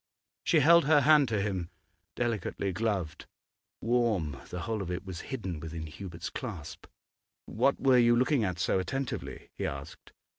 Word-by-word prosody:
She 160 - +4
held 170 +3 +6
her 150 0 +5
hand 150 -1 +6
to 110 -3 0
him, 95 -4 -2 0.5
delicately 110 -4 -1
gloved, 100 -6 -2 0.5
warm; 110 - +1
the 90 - -5
whole 110 +1 -2
of 90 - -5
it 90 +2 -4
was 95 -3 -6
hidden 95 - -4
within 80 +1 -6
Hubert's 85 +2 -7
clasp. 100 - -7 0.6
'What 130 +5 +1
were 130 -2 +5
you 120 0 +5
looking 125 +1 +2
at 90 -4 -1
so 90 - +1
attentively?' 135 +7 -4
he - - 0
asked. 70 0 -8
105 Hz, 155 wpm, -30 LUFS, 90-125 Hz, 0.6 s, held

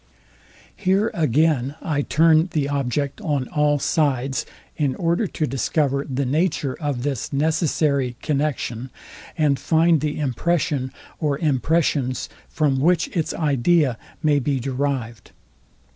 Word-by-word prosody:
Here 195 +4 +1
again 150 -2 +1
I 150 -4 -1
turn 160 +3 +3
the 145 -3 +1
object 140 - -2
on 145 - -1
all 150 0 +2
sides, 135 -3 0 0.3
in 140 -4 0
order 170 +5 0
to 155 - -2
discover 140 +2 0
the 135 +1 -1
nature 145 -1 0
of 140 -5 -2
this 135 -5 -3
necessary 145 -3 +1
connexion, 135 -5 -2 0.5
and 145 -4 +2
find 165 +2 +3
the 150 -1 -2
impression, 140 -1 0 0.3
or 145 -3 0
impressions, 145 -3 0 0.2
from 140 -4 +1
which 170 +4 +2
its 165 -3 0
idea 145 -2 +2 0.2
may 150 -2 +3
be 140 0 -1
derived. 130 -3 -3
145 Hz, 120 wpm, -22 LUFS, 135-160 Hz, 0.5 s, turn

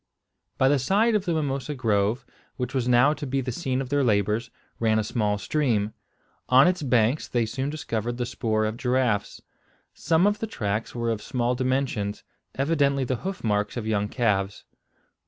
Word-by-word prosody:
By 130 - +4
the 140 0 +3
side 205 - +2
of 210 -2 +1
the 175 - 0
mimosa 145 -1 -2
grove, 110 0 0 0.3
which 125 +1 -3
was 130 -3 0
now 125 +4 +5
to 145 - -6
be 135 +1 0
the 130 -1 -2
scene 130 -1 -2
of 130 - -5
their 145 0 +2
labours, 105 0 +1 0.3
ran 110 -1 +2
a 110 - +1
small 105 -2 0
stream. 110 -4 0 0.6
On 130 +4 +7
its 180 -1 +1
banks 125 0 +2
they 120 -2 0
soon 130 +5 -3
discovered 120 -6 -3
the 120 - -1
spoor 110 -2 -1
of 110 +1 -3
giraffes. 125 -5 0 0.5
Some 165 +2 +2
of 205 0 +2
the 225 - -3
tracks 105 - -3
were 115 -1 -1
of 110 -2 -3
small 120 +2 -1
dimensions, 125 -5 -1 0.3
evidently 140 -1 +1
the 130 0 -1
hoof 190 +5 -5
marks 105 +1 0
of 115 - -3
young 105 -2 0
calves. 100 -5 0
125 Hz, 180 wpm, -25 LUFS, 110-140 Hz, 0.6 s, On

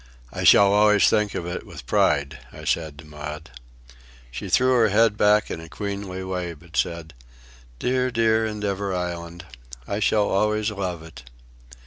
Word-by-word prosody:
"I - - -4
shall 100 0 +6
always 105 0 +5
think 105 -2 +1
of 85 - -3
it 90 +1 -5
with - - -11
pride," 70 -1 +1
I - - -11
said 80 -3 -1
to 75 - -12
Maud. 75 -1 -8 0.8
She - - -6
threw 130 0 +3
her 115 -3 +4
head 105 +1 +3
back 105 0 +3
in - - -4
a 80 - -11
queenly 100 +1 -5
way 90 -2 -4
but 85 +2 -16
said, 85 -2 -2 0.6
"Dear, 130 - 0
dear 115 -2 +2
Endeavour 100 -3 -3
Island! 85 -1 -5 0.4
I 100 - -2
shall 105 0 +2
always 105 +2 0
love 90 -5 -4
it." 65 -6 -13
100 Hz, 160 wpm, -23 LUFS, 85-105 Hz, 0.8 s, shall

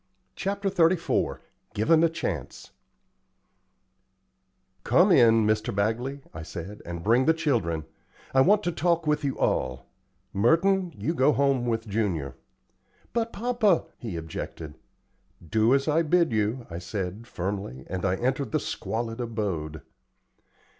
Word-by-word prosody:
CHAPTER 200 0 -2
XXXIV 170 -1 +1 0.3
GIVEN 155 +10 +4
A 165 - +5
CHANCE 90 - -5 2.1
"Come - - +4
in, 115 -2 +6
Mr. 110 -1 0
Bagley," 120 +7 -1
I 80 - -7
said, 85 +6 -8
"and 85 -1 -5
bring 120 +5 +3
the 160 - +5
children. 85 - 0 0.5
I 130 - +5
want 205 +7 +4
to 175 - 0
talk 170 -1 +1
with 150 0 +1
you 140 -2 -1
all. 65 0 -1 0.5
Merton, 175 - +3
you 165 - -1
go 150 -2 +3
home 135 -3 +1
with 115 -1 -1
Junior." 95 - -1 0.8
"But, 230 0 0
papa 225 -5 +1
" - - -39
he 110 -8 -5
objected. 80 -1 -7 0.7
"Do 110 +7 +3
as 140 +1 0
I 155 +2 +3
bid 170 0 +2
you," 110 +3 0
I 85 0 -6
said, 95 +4 -5
firmly, 95 - -4
and 95 -1 -4
I 95 -1 +2
entered 130 +2 -1
the - - +3
squalid 115 +1 -4
abode. 95 -10 -3
115 Hz, 135 wpm, -26 LUFS, 95-160 Hz, 2.1 s, in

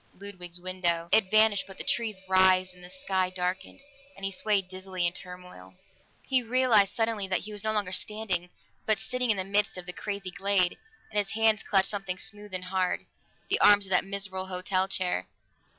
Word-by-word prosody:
Ludwig's 180 -3 -5
window! 175 -2 -1
It 215 -3 +4
vanished. 215 -1 +4
But 195 - -11
the - - -4
trees 225 -4 -1
writhed 185 -1 +4
and 180 0 -15
the 180 - -10
sky 190 -8 -1
darkened, 185 +6 -4 0.3
and 195 - -6
he 195 - 0
swayed 195 -1 0
dizzily 185 -1 -3
in 170 - +1
turmoil. 180 - -11 0.5
He 260 -1 +2
realized 240 -4 +3
suddenly 225 -3 0
that 185 -1 0
he 215 - -8
was 205 -1 -3
no 215 - 0
longer 205 -4 -1
standing, 190 -2 -1 0.4
but 215 -1 +4
sitting 250 -1 -2
in 215 - +3
the 190 - -1
midst 200 +1 0
of 180 - -7
the 180 - -6
crazy 200 -1 -5
glade, 180 0 +2 0.3
and 210 - +1
his 200 - -2
hands 220 -1 +3
clutched 195 -1 +2
something 195 -3 -3
smooth 210 +1 -3
and 185 -1 -3
hard 185 0 -1 0.4
the - - +1
arms 205 -1 +6
of 190 - -10
that 180 - +4
miserable 195 -1 -2
hotel 185 +1 0
chair. 185 -2 -1
190 Hz, 195 wpm, -28 LUFS, 185-210 Hz, 0.5 s, arms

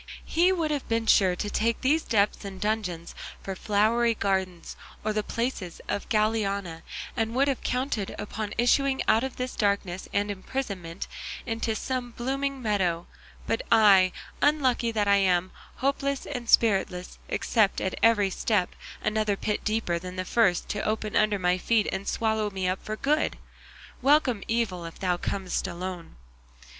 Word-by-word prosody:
He 350 +3 +3
would 330 -5 0
have 290 -3 -3
been 230 0 +1
sure 190 -4 +5
to 205 +3 -3
take 230 +1 0
these 300 +5 +3
depths 210 -6 +1
and 195 -1 -7
dungeons 195 -6 -2 0.3
for 195 - -4
flowery 225 +4 +2
gardens 190 -4 -2 0.3
or 215 - +1
the 215 - +1
palaces 225 -6 -3
of 205 - -3
Galiana, 200 -6 0 0.3
and 225 0 -1
would 275 +2 +3
have 275 -2 0
counted 250 -6 -2
upon 210 0 -5
issuing 265 +3 +3
out 220 +2 +4
of 265 -1 -4
this 255 0 -4
darkness 200 -3 -1
and 205 0 0
imprisonment 195 -5 -4 0.4
into 225 -1 -1
some 250 0 -3
blooming 270 +2 -2
meadow; 185 -6 0 0.4
but 225 - 0
I, 200 -5 +6 0.3
unlucky 260 -6 +2
that 210 -2 0
I 200 0 +5
am, 185 -2 +2 0.2
hopeless 275 0 -1
and 245 -5 -5
spiritless, 190 -5 +2
expect 215 -4 +2
at 190 - -2
every 210 -4 +4
step 200 -2 0 0.3
another 215 -2 +1
pit 210 +1 -2
deeper 215 -6 0
than 180 +1 -7
the 185 0 -3
first 190 -4 +2
to 210 - -2
open 215 -1 -2
under 210 -1 +3
my 180 -1 +1
feet 220 +2 +2
and 190 +1 -4
swallow 220 -2 0
me 190 -2 -2
up 185 +1 -2
for 215 - -4
good; 300 +7 0 0.6
'welcome 265 -5 +3
evil, 220 -7 -1
if 165 - -8
thou 180 -2 0
comest 190 0 -2
alone. 175 -1 -6
215 Hz, 160 wpm, -27 LUFS, 190-235 Hz, 0.6 s, I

